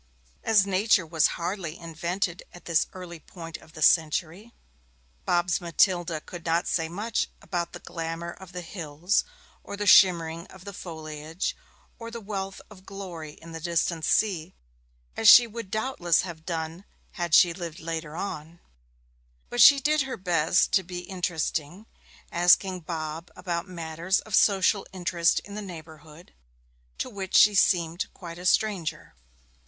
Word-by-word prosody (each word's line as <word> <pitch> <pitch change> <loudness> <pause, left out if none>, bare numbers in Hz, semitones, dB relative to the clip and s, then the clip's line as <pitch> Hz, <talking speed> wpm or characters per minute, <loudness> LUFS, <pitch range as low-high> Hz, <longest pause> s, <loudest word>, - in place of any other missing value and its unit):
As 210 -3 +4
Nature 195 -1 +2
was 160 -2 +3
hardly 170 -2 -4
invented 170 +2 -3
at 175 - -14
this 170 -2 +2
early 180 -3 -9
point 165 +1 -9
of 160 - -19
the 155 -2 -3
century, 170 +7 +2 0.7
Bob's 175 0 +1
Matilda 175 -1 +1
could 175 +1 -10
not 170 +1 +1
say 165 -2 0
much 210 +6 -2
about 175 -3 -4
the - - -7
glamour 165 0 -5
of 190 0 -13
the 180 -1 -6
hills, 165 +2 -1 0.4
or 200 - -7
the 205 - -3
shimmering 170 -3 +5
of 190 0 -15
the 200 - -7
foliage, 160 -1 -5 0.4
or 230 0 -7
the 235 0 -7
wealth 195 -2 -5
of 190 -3 -15
glory 180 -6 -8
in 165 +2 -13
the 165 - -6
distant 170 0 -1
sea, 185 -4 +1 0.6
as 220 - +5
she 240 - +10
would 230 -2 -8
doubtless 215 - +1
have 165 -3 -9
done 165 +1 -4 0.3
had 175 -3 0
she 175 -2 +6
lived 170 -2 -7
later 160 -1 -5
on; 165 -2 -6 0.9
but 245 - +2
she 280 -2 +9
did 300 +2 +2
her 265 -1 -4
best 175 -2 +2
to 195 - +4
be 175 0 -7
interesting, 175 0 -3 0.5
asking 180 +2 +4
Bob 160 0 -5
about 175 0 -3
matters 170 +1 -1
of 215 - -12
social 195 0 +4
interest 175 -2 +1
in 200 - -12
the 210 - -5
neighbourhood, 160 -3 -12 0.6
to - - -3
which 190 -2 -5
she 210 - +7
seemed 175 -3 +2
quite 170 -1 -9
a 180 - -2
stranger. 180 -7 0
175 Hz, 150 wpm, -26 LUFS, 165-195 Hz, 0.9 s, she